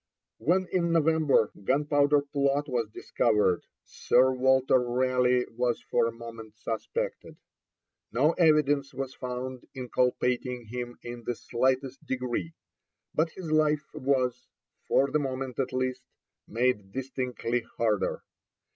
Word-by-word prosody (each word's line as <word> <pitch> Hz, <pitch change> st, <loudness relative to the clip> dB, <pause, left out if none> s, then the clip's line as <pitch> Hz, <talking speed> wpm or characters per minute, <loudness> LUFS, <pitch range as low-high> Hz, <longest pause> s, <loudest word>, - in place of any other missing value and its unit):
When, 185 Hz, +4 st, +2 dB
in 170 Hz, -2 st, +1 dB
November, 160 Hz, -7 st, +3 dB
Gunpowder 145 Hz, +3 st, +3 dB
Plot 140 Hz, 0 st, 0 dB
was 120 Hz, -5 st, -1 dB
discovered, 105 Hz, -4 st, +1 dB, 0.2 s
Sir 130 Hz, +2 st, +3 dB
Walter 130 Hz, 0 st, +4 dB
Raleigh 125 Hz, 0 st, +2 dB
was 120 Hz, 0 st, 0 dB
for -, -, +1 dB
a -, -, -2 dB
moment 115 Hz, -2 st, -10 dB
suspected. 115 Hz, -3 st, -4 dB, 0.7 s
No 135 Hz, +8 st, +3 dB
evidence 150 Hz, -5 st, +3 dB
was 135 Hz, 0 st, -4 dB
found 125 Hz, 0 st, -6 dB
inculpating 125 Hz, -1 st, 0 dB
him 120 Hz, +2 st, -6 dB
in 120 Hz, 0 st, -7 dB
the 120 Hz, -, -1 dB
slightest 130 Hz, +3 st, -1 dB
degree; 130 Hz, +5 st, -3 dB, 0.6 s
but 160 Hz, +2 st, +2 dB
his 165 Hz, -2 st, -7 dB
life 155 Hz, -1 st, +2 dB
was, 130 Hz, -2 st, 0 dB, 0.4 s
for 135 Hz, 0 st, +3 dB
the 150 Hz, -, +2 dB
moment 130 Hz, -2 st, -4 dB
at 135 Hz, -, 0 dB
least, 130 Hz, 0 st, -1 dB, 0.5 s
made 115 Hz, -4 st, 0 dB
distinctly 125 Hz, -2 st, -2 dB, 0.2 s
harder. 105 Hz, -4 st, 0 dB
130 Hz, 120 wpm, -28 LUFS, 120-140 Hz, 0.7 s, Walter